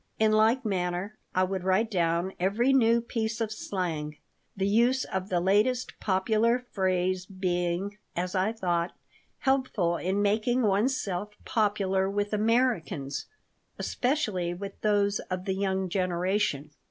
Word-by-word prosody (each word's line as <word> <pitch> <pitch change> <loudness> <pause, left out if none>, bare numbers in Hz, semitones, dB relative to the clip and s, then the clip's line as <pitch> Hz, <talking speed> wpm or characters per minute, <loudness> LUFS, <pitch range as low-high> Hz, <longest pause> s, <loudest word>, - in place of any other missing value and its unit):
In 220 0 +3
like 225 +4 +3
manner 185 0 -2 0.2
I 185 - +4
would 185 0 -2
write 190 +5 +2
down 170 0 +1
every 215 +9 +2
new 235 -3 +4
piece 230 -1 -3
of 225 -2 -1
slang, 165 -8 -3 0.4
the 195 - 0
use 240 +5 +3
of 190 +1 -4
the 180 - +1
latest 210 +8 +2
popular 220 +5 +1
phrase 185 -1 0
being, 185 +1 -2 0.2
as 180 +2 -2
I 190 +2 +1
thought, 175 -5 -1 0.5
helpful 255 -11 +1
in 190 +4 0
making 220 +5 +2
oneself 205 -2 0
popular 195 -3 +1
with 205 +1 -2
Americans, 210 - 0 0.5
especially 210 - -1
with 195 +2 -6
those 205 -1 +2
of 185 0 -3
the 190 - 0
young 190 -1 -1
generation. 180 -4 0
195 Hz, 130 wpm, -28 LUFS, 180-220 Hz, 0.5 s, I